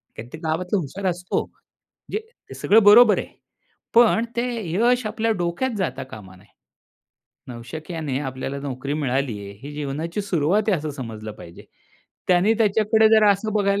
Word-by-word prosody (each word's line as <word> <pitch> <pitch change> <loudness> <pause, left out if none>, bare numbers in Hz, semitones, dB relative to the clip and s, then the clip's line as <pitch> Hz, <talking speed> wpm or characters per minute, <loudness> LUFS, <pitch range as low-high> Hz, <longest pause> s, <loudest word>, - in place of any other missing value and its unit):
काय 110 - -8
ते - - -6
गावातला 180 +5 -1
हुशार 180 +6 -6
असतो. 180 +1 -2
म्हणजे 425 - -10 0.3
हे - - -9
सगळं 220 +1 +4
बरोबर 215 +2 +7
आहे. - - -5 0.7
पण 230 0 +5
ते 235 - 0 0.3
यश 240 +5 +2
आपल्या 225 +1 -1
डोक्यात 175 +10 -1
जाता 140 -8 -2
कामा 95 -4 -11
नये. 95 +3 -22 1.0
नवशिक्याने 140 +4 -5
आपल्याला 135 0 -5
नोकरी 140 0 -5
मिळाली 135 -6 -1
आहे, 100 - -9
ही 145 +1 -8
जीवनाची 150 +6 -4
सुरुवात 185 +2 +1
आहे, 190 -6 +3
असं 150 0 -4
समजलं 110 -6 -7
पाहिजे. 85 -5 -13 0.6
त्याने 185 +5 +4
त्याच्याकडे 220 +1 +3
जरा 215 -2 +6
असं 215 +2 -4
बघायला 200 -1 +1
170 Hz, 150 wpm, -22 LUFS, 135-210 Hz, 1.0 s, बरोबर